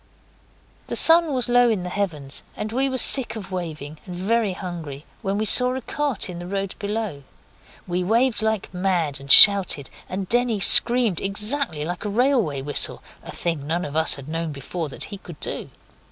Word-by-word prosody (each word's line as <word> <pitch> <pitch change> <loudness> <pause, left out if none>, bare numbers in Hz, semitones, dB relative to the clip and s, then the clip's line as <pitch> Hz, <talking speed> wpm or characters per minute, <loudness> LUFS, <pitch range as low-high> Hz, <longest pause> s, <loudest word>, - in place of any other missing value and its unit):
The - - -5
sun 330 -1 +7
was 255 -2 -2
low 245 0 +3
in 210 -5 -2
the 180 - -6
heavens, 155 -9 -4 0.2
and 215 - -5
we 265 +3 -1
were 260 - -4
sick 255 -1 +4
of 195 -4 -9
waving 155 -4 -7
and 180 - -8
very 210 +2 -1
hungry, 165 -6 -9 0.2
when 195 -2 -3
we 215 - -2
saw 250 +4 +4
a 260 - -5
cart 285 -1 -3
in 175 -2 -8
the 175 - -9
road 195 0 -4
below. 205 -7 -5 0.6
We 180 0 -3
waved 230 +4 0
like 220 -3 -3
mad, 180 -6 -2
and 140 0 -5
shouted, 195 -8 +6 0.2
and 190 0 -5
Denny 240 -1 0
screamed 235 -2 +6
exactly 210 - -2
like 175 +3 -6
a 210 - -4
railway 215 - -1
whistle, 145 0 -1 0.2
a - - -13
thing 165 -5 -5
none 170 +3 -3
of 145 - -8
us 160 0 +2
had 140 -1 -12
known 165 0 -5
before 150 +3 -6
that - - -8
he 200 - -8
could 170 -5 -13
do. - - -4
195 Hz, 190 wpm, -21 LUFS, 165-230 Hz, 0.6 s, sun